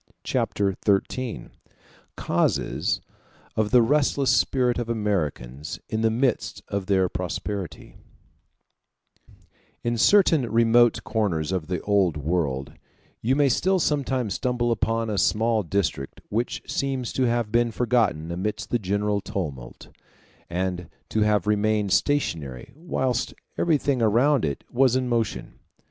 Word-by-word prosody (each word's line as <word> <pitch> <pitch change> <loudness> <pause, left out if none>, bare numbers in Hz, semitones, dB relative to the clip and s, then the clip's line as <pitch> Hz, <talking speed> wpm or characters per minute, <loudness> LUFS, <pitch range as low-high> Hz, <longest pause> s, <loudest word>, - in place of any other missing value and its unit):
Chapter 100 -2 0
XIII: 110 +4 -1 0.7
Causes - - 0 0.5
Of 110 -1 +1
The 125 0 +5
Restless 140 +1 +2
Spirit 125 -2 +1
Of 120 -1 -4
Americans 75 - -2
In 110 - -1
The 115 - +3
Midst 120 +2 -1
Of 100 -1 -3
Their 95 -2 +3
Prosperity 90 +1 -5 1.9
In 120 -1 -1
certain 160 - +4
remote 115 +1 +4
corners 95 -8 -1
of 90 -5 -2
the 90 -1 -2
Old 95 -6 +2
World 70 -3 -2 0.5
you 125 +4 +2
may 145 0 +4
still 190 +9 +2
sometimes 135 - 0
stumble 125 -1 0
upon 115 0 0
a 100 - 0
small 110 0 +2
district 90 -7 -2
which 115 +4 -2
seems 135 -3 -2
to 130 - +1
have 115 -2 0
been 120 +1 +3
forgotten 115 -9 0
amidst 95 +5 -3
the 120 - +2
general 100 +1 0
tumult, 80 - -6 0.6
and 90 0 -3 0.2
to 110 - -1
have 105 -3 +2
remained 105 -1 +1
stationary 80 - -1
whilst 130 -6 -2 0.2
everything 145 -6 +1
around 120 - +3
it 70 -2 -3
was 130 0 +3
in 130 -1 0
motion. 115 -3 -2
110 Hz, 125 wpm, -25 LUFS, 95-125 Hz, 1.9 s, The